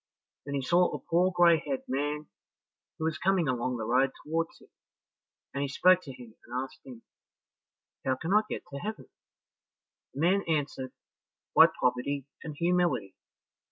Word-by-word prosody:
Then 140 Hz, -, -3 dB
he 135 Hz, -, -1 dB
saw 175 Hz, +6 st, +4 dB
a -, -, -4 dB
poor 180 Hz, +2 st, +1 dB
gray 175 Hz, -2 st, +5 dB
haired 140 Hz, -3 st, -4 dB
man 145 Hz, +3 st, -2 dB, 0.7 s
who 160 Hz, -, -3 dB
was 160 Hz, -1 st, -1 dB
coming 185 Hz, -3 st, +2 dB
along 125 Hz, 0 st, -1 dB
the 110 Hz, -, -4 dB
road 130 Hz, +4 st, +3 dB
towards 165 Hz, +2 st, -2 dB
him, -, -, -20 dB, 0.8 s
and 140 Hz, -, -2 dB
he 140 Hz, -, 0 dB
spoke 185 Hz, +6 st, +4 dB
to 140 Hz, -, -9 dB
him, 120 Hz, -3 st, -12 dB
and 125 Hz, +2 st, -3 dB
asked, 135 Hz, 0 st, -11 dB, 1.2 s
"How 130 Hz, -, +1 dB
can 165 Hz, +8 st, -2 dB
I 210 Hz, -, +6 dB
get -, -, -4 dB
to 140 Hz, -, -5 dB
heaven?" 215 Hz, +7 st, -6 dB, 1.1 s
The 140 Hz, -, -3 dB
man 190 Hz, +4 st, +3 dB
answered, 145 Hz, -4 st, -2 dB, 0.6 s
"By -, -, +9 dB
poverty 125 Hz, +2 st, 0 dB, 0.2 s
and 155 Hz, -2 st, -6 dB
humility. 170 Hz, -, +1 dB
145 Hz, 160 wpm, -29 LUFS, 130-170 Hz, 1.2 s, By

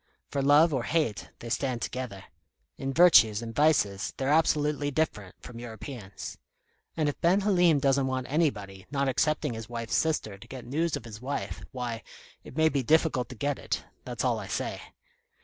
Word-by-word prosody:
For 140 Hz, -, 0 dB
love 145 Hz, +4 st, +5 dB
or 130 Hz, -, +1 dB
hate, 145 Hz, -5 st, -1 dB
they 115 Hz, -, -6 dB
stand 125 Hz, 0 st, -1 dB
together. 120 Hz, -7 st, -5 dB, 0.5 s
In 135 Hz, 0 st, -3 dB
virtues 120 Hz, -9 st, +6 dB
and 115 Hz, -1 st, -6 dB
vices 120 Hz, -9 st, +2 dB
they're 135 Hz, 0 st, -1 dB
absolutely 150 Hz, -2 st, +2 dB
different 130 Hz, -, -2 dB
from 115 Hz, -1 st, -9 dB
Europeans. 115 Hz, -2 st, -8 dB, 0.6 s
And 155 Hz, -2 st, +1 dB
if 145 Hz, -, -3 dB
Ben 180 Hz, +4 st, +4 dB
Halim 180 Hz, -6 st, +4 dB
doesn't 135 Hz, -1 st, +2 dB
want 130 Hz, -1 st, -2 dB
anybody, 105 Hz, -, -1 dB
not 140 Hz, -1 st, 0 dB
excepting 155 Hz, -1 st, +1 dB
his 110 Hz, 0 st, -7 dB
wife's 115 Hz, -1 st, -3 dB
sister, 155 Hz, -11 st, 0 dB
to -, -, -13 dB
get 130 Hz, -2 st, -8 dB
news 160 Hz, +6 st, 0 dB
of -, -, -11 dB
his 110 Hz, -1 st, -9 dB
wife, 140 Hz, +2 st, -4 dB
why, 120 Hz, -4 st, -4 dB, 0.4 s
it -, -, -12 dB
may 160 Hz, 0 st, +5 dB
be 140 Hz, -3 st, +1 dB
difficult 145 Hz, -3 st, +2 dB
to 125 Hz, -, -8 dB
get 145 Hz, +5 st, -1 dB
it, -, -, -3 dB, 0.2 s
that's -, -, -4 dB
all -, -, +1 dB
I -, -, -7 dB
say. -, -, -3 dB
135 Hz, 180 wpm, -28 LUFS, 115-155 Hz, 0.6 s, virtues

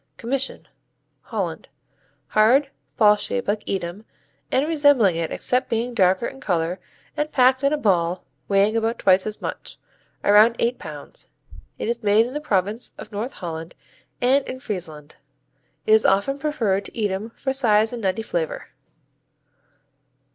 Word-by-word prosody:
Commission 270 Hz, +3 st, -3 dB, 0.5 s
Holland -, -, -4 dB, 0.6 s
Hard; 255 Hz, +7 st, +4 dB, 0.3 s
ball 210 Hz, -2 st, +6 dB
shaped 100 Hz, -, -3 dB
like 210 Hz, +1 st, 0 dB
Edam 190 Hz, +1 st, -3 dB, 0.5 s
and 270 Hz, +3 st, +2 dB
resembling 285 Hz, -, +4 dB
it 165 Hz, -1 st, -2 dB
except 250 Hz, 0 st, 0 dB
being 235 Hz, +2 st, -1 dB
darker 190 Hz, 0 st, +3 dB
in 270 Hz, -, -6 dB
color 175 Hz, -2 st, -1 dB, 0.4 s
and 300 Hz, +1 st, -2 dB
packed 260 Hz, 0 st, +4 dB
in 280 Hz, -, +3 dB
a 300 Hz, -, +1 dB
ball 180 Hz, -7 st, 0 dB, 0.2 s
weighing 200 Hz, +2 st, +3 dB
about 225 Hz, +1 st, 0 dB
twice 190 Hz, +1 st, +3 dB
as 215 Hz, -, -6 dB
much, -, -, -6 dB, 0.5 s
around 210 Hz, +3 st, +6 dB
eight 240 Hz, +2 st, 0 dB
pounds. -, -, -9 dB, 0.5 s
It -, -, -4 dB
is 235 Hz, 0 st, -2 dB
made 210 Hz, +1 st, +4 dB
in 250 Hz, -, -7 dB
the 295 Hz, -, -3 dB
province 210 Hz, -1 st, -1 dB
of 215 Hz, -, -10 dB
North 220 Hz, +6 st, -4 dB
Holland 165 Hz, -2 st, -7 dB, 0.4 s
and 265 Hz, +3 st, +3 dB
in 255 Hz, -, -6 dB
Friesland. 160 Hz, -, -7 dB, 0.7 s
It 435 Hz, -, 0 dB
is 440 Hz, -, +6 dB
often 200 Hz, +9 st, +2 dB
preferred 220 Hz, -10 st, 0 dB
to -, -, -11 dB
Edam 205 Hz, 0 st, -2 dB
for 265 Hz, -1 st, -2 dB
size 220 Hz, -4 st, +2 dB
and 240 Hz, -, -5 dB
nutty 195 Hz, +2 st, -1 dB
flavor. -, -, -3 dB
220 Hz, 150 wpm, -23 LUFS, 195-260 Hz, 0.7 s, ball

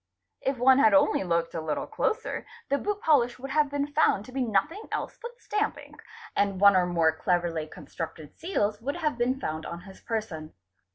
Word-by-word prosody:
If 270 Hz, 0 st, -1 dB
one 260 Hz, +2 st, +5 dB
had 295 Hz, +1 st, +6 dB
only 290 Hz, -7 st, +4 dB
looked 170 Hz, -2 st, 0 dB
a 165 Hz, -, -3 dB
little 155 Hz, -1 st, -2 dB
closer, 455 Hz, +2 st, -2 dB, 0.2 s
the 280 Hz, -, +2 dB
boot 415 Hz, 0 st, -2 dB
polish 250 Hz, -6 st, +3 dB
would 270 Hz, +2 st, -7 dB
have 300 Hz, -1 st, +3 dB
been 285 Hz, 0 st, -1 dB
found 290 Hz, -8 st, +2 dB
to 255 Hz, -, -12 dB
be 265 Hz, +1 st, -2 dB
nothing 245 Hz, -, 0 dB
else -, -, -3 dB
but 480 Hz, 0 st, -8 dB
stamp 425 Hz, +1 st, -1 dB
ink, -, -, -13 dB, 0.3 s
and 200 Hz, -2 st, +1 dB
one 200 Hz, 0 st, +7 dB
or 180 Hz, -1 st, +3 dB
more 165 Hz, -2 st, +3 dB
cleverly 170 Hz, -2 st, 0 dB
constructed 160 Hz, -1 st, -8 dB
seals 215 Hz, -, -1 dB
would 280 Hz, +4 st, -2 dB
have 310 Hz, -5 st, -1 dB
been 250 Hz, +2 st, 0 dB
found 155 Hz, -6 st, -3 dB
on 170 Hz, 0 st, -6 dB
his 195 Hz, 0 st, -14 dB
person. 190 Hz, -9 st, -4 dB
235 Hz, 195 wpm, -27 LUFS, 175-290 Hz, 0.3 s, one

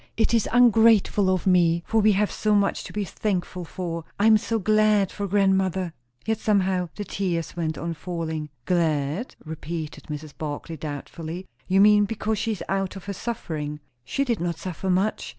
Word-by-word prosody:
"It 225 Hz, 0 st, +2 dB
is 230 Hz, -3 st, +2 dB
ungrateful 225 Hz, -4 st, +5 dB
of 185 Hz, -2 st, 0 dB
me; 170 Hz, -2 st, +3 dB
for 220 Hz, 0 st, +2 dB
we 210 Hz, 0 st, +5 dB
have 205 Hz, +1 st, +1 dB
so 215 Hz, -1 st, +1 dB
much 200 Hz, -1 st, +1 dB
to -, -, -8 dB
be 210 Hz, -, -2 dB
thankful 185 Hz, -2 st, -2 dB
for. 170 Hz, -1 st, -5 dB, 0.2 s
I 205 Hz, -, +3 dB
am 220 Hz, 0 st, +7 dB
so 225 Hz, +1 st, 0 dB
glad 215 Hz, -1 st, +3 dB
for 200 Hz, -1 st, -4 dB
grandmother!" 190 Hz, -3 st, +1 dB, 0.3 s
Yet 220 Hz, 0 st, 0 dB
somehow 190 Hz, -4 st, +1 dB
the 205 Hz, -, -4 dB
tears 175 Hz, -5 st, -2 dB
went 160 Hz, -2 st, -2 dB
on 170 Hz, 0 st, -3 dB
falling. 160 Hz, -2 st, -4 dB, 0.2 s
"Glad?" 160 Hz, -, 0 dB
repeated 160 Hz, 0 st, -6 dB
Mrs. 150 Hz, 0 st, -7 dB
Barclay 155 Hz, +1 st, -5 dB
doubtfully. 160 Hz, +4 st, -6 dB, 0.2 s
"You 190 Hz, +1 st, +4 dB
mean, 210 Hz, 0 st, +6 dB
because 220 Hz, 0 st, -2 dB
she 225 Hz, -, -1 dB
is 200 Hz, -, -6 dB
out 195 Hz, 0 st, -1 dB
of 195 Hz, -, -9 dB
her 200 Hz, -, -3 dB
suffering." 155 Hz, -9 st, -4 dB, 0.2 s
"She 275 Hz, -, -1 dB
did 235 Hz, -5 st, 0 dB
not 170 Hz, -1 st, -2 dB
suffer 185 Hz, +2 st, -4 dB
much. 190 Hz, +4 st, 0 dB
185 Hz, 180 wpm, -25 LUFS, 165-210 Hz, 0.3 s, am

